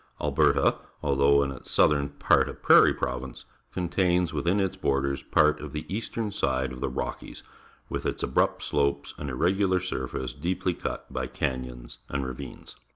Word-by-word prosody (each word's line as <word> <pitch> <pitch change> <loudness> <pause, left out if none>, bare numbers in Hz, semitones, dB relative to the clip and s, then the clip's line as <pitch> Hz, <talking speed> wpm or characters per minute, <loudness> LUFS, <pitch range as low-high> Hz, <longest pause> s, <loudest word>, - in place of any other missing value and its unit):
.\lberta, - - +3 0.2
although 70 0 +4
in 70 - -2
its 65 - -9
southern 70 -2 +3
part 70 - +2
a - - -7
prairie - - +6
pro\'ince, 65 0 -4 0.3
contains 90 -1 +1
within 85 +7 +1
its 95 -1 0
borders 70 -6 0
part 75 0 +3
of - - -7
the 75 - -4
eastern 110 -1 -3
side 65 -8 -1
of 65 - -9
the 70 - 0
Rockies, 65 - -5 0.4
with - - -3
its - - -3
abrupt - - +1
slopes 70 0 0
and 75 - -4
irregular 95 +7 +2
surface 65 -8 -4
deeply 90 +5 -1
cut - - -6
b}'^ 65 -1 -3
canyons 65 -2 -4
and 70 -1 -2
ra^dnes. 65 -1 -8
70 Hz, 160 wpm, -27 LUFS, 65-90 Hz, 0.4 s, prairie